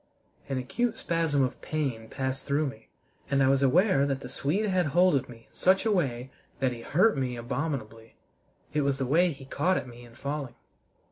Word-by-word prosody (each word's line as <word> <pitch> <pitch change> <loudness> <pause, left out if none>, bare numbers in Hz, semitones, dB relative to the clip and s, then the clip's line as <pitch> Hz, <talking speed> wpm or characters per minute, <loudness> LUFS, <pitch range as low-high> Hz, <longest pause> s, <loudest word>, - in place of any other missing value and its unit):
An 135 - -1
acute 225 - -1
spasm 165 -5 +1
of 130 - -3
pain 130 -8 -3
passed 130 -1 -3
through 145 +2 +1
me, 110 -6 -7 0.4
and 140 -1 +3
I - - +4
was 135 0 +3
aware 140 +1 +4
that 135 -1 -2
the 125 - -7
Swede 160 +11 -1
had 185 -4 +1
hold 175 +5 +4
of 135 - -1
me 115 -1 -13
in - - -31
such 190 +3 +3
a 220 - +3
way 135 - -1 0.3
that 130 -2 +1
he 120 -1 -7
hurt 185 - +3
me 130 -3 -1
abominably. 115 -3 -4 0.6
It 150 - +2
was 140 -1 +1
the 135 - -1
way 170 +7 +3
he 135 -2 -10
caught 170 +7 +1
at - - -4
me 120 0 -12
in 120 -1 -15
falling. 140 -2 -4
140 Hz, 205 wpm, -28 LUFS, 125-165 Hz, 0.6 s, I